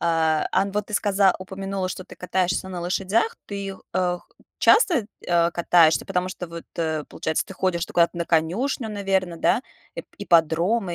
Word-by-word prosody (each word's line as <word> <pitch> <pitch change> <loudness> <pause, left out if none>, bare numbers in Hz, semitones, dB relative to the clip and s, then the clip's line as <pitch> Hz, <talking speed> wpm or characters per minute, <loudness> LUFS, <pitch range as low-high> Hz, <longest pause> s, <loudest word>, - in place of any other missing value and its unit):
А, 160 -2 +2
ан 195 +1 +1
вот 210 0 -2
ты 210 - -6
сказа 200 -2 +3
упомянула, 190 0 -4
что 185 0 -6
ты - - -14
катаешься 185 0 -1
на 180 -2 -5
лошадях. 195 +6 0
Ты, 200 -1 -5
э, - - -16
х 180 -1 0 0.4
часто, 325 - +4 0.2
э, 170 -1 +3
катаешься? 170 -2 +3
Потому 185 -1 -1
что 180 - -6
вот, 170 0 -8
э, 160 -2 -1
получается, 160 0 -2
ты - - -9
ходишь 180 -3 0
ты - - -13
куда-то 170 0 +3
на 170 - -1
конюшню, 195 - 0
наверно, 195 -4 -1
да? 230 - +2 0.3
Ип - - -7
ипподрома 175 +2 +2
185 Hz, 175 wpm, -24 LUFS, 170-195 Hz, 0.4 s, часто